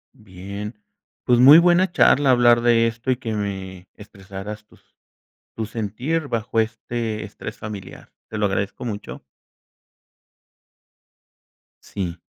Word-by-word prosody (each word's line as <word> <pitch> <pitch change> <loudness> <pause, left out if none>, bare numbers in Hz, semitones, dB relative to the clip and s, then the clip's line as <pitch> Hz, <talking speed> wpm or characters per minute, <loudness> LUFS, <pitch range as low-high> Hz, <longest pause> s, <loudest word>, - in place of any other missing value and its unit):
Bien, 100 - -9 0.4
pues, 120 -1 +3
muy 140 +5 +9
buena 175 +1 +4
charla 145 -4 +4
hablar 120 -1 +5
de 115 -1 +4
esto, 115 +3 -5
y 125 - 0
que 115 -3 -5
me 95 -3 -5
expresaras 100 0 -9
tus - - -24 0.7
tu 110 - -4
sentir 120 +9 -3
bajo 115 -1 -2
este 110 0 -3
estrés - - -9
familiar. 105 -3 -9 0.2
Te 110 - -6
lo 105 - +2
agradezco 100 +5 -3
mucho. 105 -2 -6 2.6
Sí. 90 -4 -5
110 Hz, 115 wpm, -22 LUFS, 100-120 Hz, 2.6 s, muy